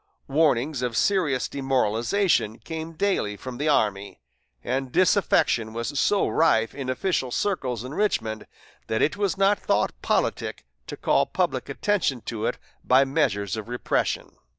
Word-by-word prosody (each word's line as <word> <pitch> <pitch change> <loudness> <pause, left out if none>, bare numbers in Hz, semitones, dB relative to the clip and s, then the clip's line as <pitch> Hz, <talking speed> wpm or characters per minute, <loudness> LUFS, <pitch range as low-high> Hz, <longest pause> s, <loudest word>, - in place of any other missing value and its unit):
Warnings 140 -2 +1
of 120 -3 -2
serious 165 -10 +1
demoralization 130 - +1
came 160 0 -7
daily 155 - 0
from 130 +1 -8
the 150 +2 +1
army, 100 -7 0 0.4
and 130 +1 -2
disaffection 155 - +2
was 115 +5 -3
so 205 -1 +2
rife 115 -9 +2
in 135 -2 -5
official 130 0 -1
circles 125 - -2
in 130 +3 -7
Richmond 115 - -1 0.4
that 110 - +1
it 155 - +1
was 200 -2 -1
not 195 +1 +3
thought - - +1
politic - - -1 0.2
to - - -7
call - - +2
public - - -1
attention 185 - 0
to 110 -1 -3
it - - -2 0.3
by 130 +2 +5
measures 105 - 0
of 110 +1 -7
repression. 120 0 -1
130 Hz, 145 wpm, -25 LUFS, 115-165 Hz, 0.4 s, by